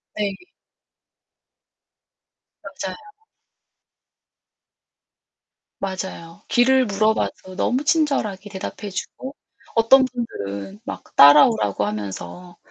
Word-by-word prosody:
네. 200 Hz, -2 st, -2 dB, 2.3 s
맞아요. -, -, -6 dB, 2.8 s
맞아요. 190 Hz, -1 st, -6 dB
길을 260 Hz, +1 st, +4 dB
물어봐도 200 Hz, -2 st, -1 dB
너무 255 Hz, +7 st, 0 dB
친절하게 270 Hz, -, 0 dB
대답해 200 Hz, +1 st, -6 dB
주고 260 Hz, +8 st, -7 dB, 0.4 s
어떤 260 Hz, +4 st, +6 dB
분들은 195 Hz, -, -6 dB
막 275 Hz, -, -7 dB
따라오라고 110 Hz, -8 st, +6 dB
하면서 105 Hz, -, -6 dB
195 Hz, 180 characters per minute, -22 LUFS, 165-245 Hz, 2.8 s, 어떤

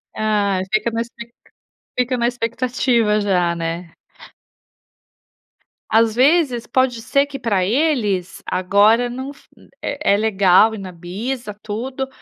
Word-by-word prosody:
Ah, 205 Hz, -3 st, +1 dB
fica 215 Hz, +2 st, +2 dB
na 230 Hz, 0 st, -1 dB
expec 235 Hz, 0 st, -9 dB, 0.7 s
fica 250 Hz, +1 st, +1 dB
na 235 Hz, 0 st, +1 dB
expectativa 240 Hz, -2 st, 0 dB
já, 180 Hz, -4 st, +1 dB
né? 165 Hz, 0 st, -4 dB, 2.0 s
Às 225 Hz, 0 st, +4 dB
vezes 260 Hz, -2 st, +2 dB
pode 250 Hz, -2 st, +1 dB
ser 275 Hz, +4 st, +2 dB
que 280 Hz, -1 st, -8 dB
para 200 Hz, -6 st, 0 dB
eles, 215 Hz, -, 0 dB
agora 205 Hz, +6 st, +3 dB
não 260 Hz, +3 st, -6 dB
f -, -, -23 dB, 0.3 s
é 285 Hz, -7 st, 0 dB
é -, -, +3 dB
legal 210 Hz, 0 st, +4 dB
ir -, -, -7 dB
na 190 Hz, -2 st, -7 dB
bisa 210 Hz, +8 st, -5 dB
e 205 Hz, 0 st, -8 dB
tudo, 255 Hz, +5 st, -4 dB
225 Hz, 135 wpm, -20 LUFS, 200-250 Hz, 2.0 s, Às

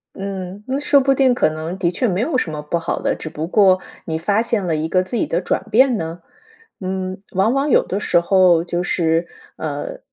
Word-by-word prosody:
嗯， 195 Hz, 0 st, -6 dB
那 265 Hz, +2 st, -1 dB
说 290 Hz, -1 st, +4 dB
不 275 Hz, 0 st, +3 dB
定 265 Hz, -1 st, +3 dB
可 155 Hz, -, +2 dB
能 160 Hz, +3 st, -5 dB
的 175 Hz, -2 st, 0 dB
确 245 Hz, +7 st, 0 dB
没 190 Hz, -1 st, 0 dB
有 265 Hz, +3 st, 0 dB
什 170 Hz, -, -1 dB
么 150 Hz, -1 st, -5 dB
不 150 Hz, +3 st, -2 dB
好 165 Hz, -, -3 dB
的， -, -, 0 dB
只 160 Hz, -, -7 dB
不 155 Hz, +1 st, -4 dB
过 185 Hz, 0 st, +4 dB, 0.3 s
你 160 Hz, -1 st, -2 dB
发 200 Hz, +6 st, +1 dB
现 230 Hz, -3 st, -1 dB
了 165 Hz, -3 st, 0 dB
一 155 Hz, +1 st, -1 dB
个 185 Hz, +2 st, +2 dB
自 185 Hz, +6 st, -6 dB
己 230 Hz, -, +1 dB
的 170 Hz, -, -1 dB
转 -, -, -1 dB
变 255 Hz, +1 st, +4 dB
呢。 165 Hz, 0 st, -5 dB, 0.6 s
嗯， 185 Hz, 0 st, -4 dB
往 195 Hz, +5 st, +2 dB
往 275 Hz, +2 st, 0 dB
有 -, -, +4 dB
的 195 Hz, -, -3 dB
时 175 Hz, -, +2 dB
候 175 Hz, -1 st, +4 dB
就 175 Hz, 0 st, -2 dB
是， 165 Hz, -1 st, 0 dB, 0.3 s
呃， -, -, -5 dB
185 Hz, 245 characters per minute, -20 LUFS, 170-230 Hz, 0.6 s, 说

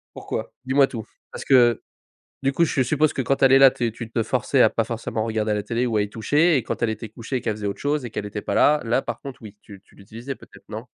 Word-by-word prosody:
Pourquoi? -, -, -5 dB
Dis-moi 135 Hz, +1 st, +4 dB
tout. 110 Hz, -4 st, -7 dB, 0.3 s
Parce -, -, -8 dB
que 120 Hz, -3 st, +4 dB, 0.6 s
du 135 Hz, 0 st, +1 dB
coup 170 Hz, -, +3 dB
je 140 Hz, -4 st, +1 dB
suppose 150 Hz, +4 st, +1 dB
que -, -, -3 dB
quand 135 Hz, +2 st, 0 dB
elle 135 Hz, -1 st, +6 dB
est 135 Hz, -, +8 dB
là 135 Hz, -1 st, +8 dB
t 120 Hz, -2 st, -2 dB
tu 120 Hz, 0 st, -8 dB
te 115 Hz, -, 0 dB
forçais -, -, +1 dB
à -, -, +5 dB
pas -, -, 0 dB
forcément 110 Hz, -, -3 dB
regarder 110 Hz, -1 st, -1 dB
la 105 Hz, -1 st, -1 dB
télé 120 Hz, +3 st, -1 dB
ou 115 Hz, -2 st, -1 dB
à 105 Hz, -, +3 dB
y 105 Hz, -, -3 dB
toucher. 150 Hz, -, +2 dB
Et 130 Hz, -, 0 dB
quand -, -, -5 dB
elle 115 Hz, -, +2 dB
était 110 Hz, 0 st, -6 dB
couchée 115 Hz, +4 st, -5 dB
qu'elle 110 Hz, -2 st, -2 dB
faisait 105 Hz, -1 st, -5 dB
autre 100 Hz, -, -4 dB
chose 145 Hz, -1 st, -1 dB
et 120 Hz, -, -6 dB
qu'elle 105 Hz, -, -5 dB
était 105 Hz, 0 st, -6 dB
pas -, -, -3 dB
là, 150 Hz, +1 st, +4 dB
là 120 Hz, +4 st, +1 dB
par -, -, -6 dB
contre 135 Hz, -2 st, -9 dB
oui. 105 Hz, -1 st, -11 dB
Tu 100 Hz, -2 st, -13 dB
tu -, -, -25 dB
l'utilisais 115 Hz, +7 st, -8 dB
peut-être, 100 Hz, -5 st, -18 dB
non? 110 Hz, +2 st, -7 dB
120 Hz, 280 wpm, -23 LUFS, 110-135 Hz, 0.6 s, est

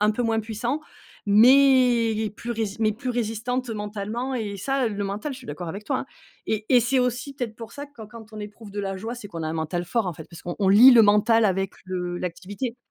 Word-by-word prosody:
un 210 Hz, +1 st, +4 dB
peu 245 Hz, +3 st, -2 dB
moins 225 Hz, -1 st, +1 dB
puissant, 230 Hz, +6 st, -3 dB, 0.4 s
mais 235 Hz, -1 st, +5 dB
plus 240 Hz, -, -6 dB
rési 220 Hz, -3 st, -3 dB
mais 215 Hz, -1 st, +3 dB
plus 250 Hz, +4 st, -4 dB
résistante 240 Hz, +2 st, -2 dB
mentalement, 215 Hz, +4 st, -4 dB
et 210 Hz, -4 st, -3 dB
ça 270 Hz, +4 st, 0 dB
le 205 Hz, -1 st, -3 dB
mental, 205 Hz, +8 st, -4 dB
je -, -, -10 dB
suis 255 Hz, -, -14 dB
d'accord 175 Hz, -6 st, -6 dB
avec 200 Hz, +5 st, -7 dB
toi, -, -, -1 dB
hein -, -, -5 dB, 0.4 s
et 215 Hz, -1 st, -1 dB
et 250 Hz, -2 st, +6 dB
c'est 260 Hz, +3 st, +1 dB
aussi 250 Hz, +2 st, -1 dB
peut-être 245 Hz, -5 st, -5 dB
pour 230 Hz, 0 st, -9 dB
ça 285 Hz, +3 st, -7 dB
quand 230 Hz, -7 st, -12 dB
quand 220 Hz, -1 st, -13 dB
on 215 Hz, -, -7 dB
éprouve 210 Hz, 0 st, -10 dB
de 205 Hz, -, -3 dB
la 195 Hz, -1 st, -3 dB
joie, 225 Hz, +5 st, -5 dB
c'est 230 Hz, -4 st, -9 dB
qu'on 165 Hz, -4 st, -5 dB
a -, -, -2 dB
un -, -, -3 dB
mental 165 Hz, +2 st, -2 dB
fort, 220 Hz, +2 st, -1 dB
en -, -, -2 dB
fait, 160 Hz, 0 st, -10 dB
parce 170 Hz, -, -12 dB
qu'on 175 Hz, -, -5 dB
on 195 Hz, -2 st, +2 dB
lie 225 Hz, +7 st, +9 dB
le 240 Hz, -3 st, +8 dB
mental 215 Hz, +2 st, +4 dB
avec 195 Hz, -1 st, 0 dB
le 180 Hz, -1 st, -3 dB
l'activité. 200 Hz, +7 st, -5 dB
220 Hz, 240 wpm, -24 LUFS, 200-245 Hz, 0.4 s, lie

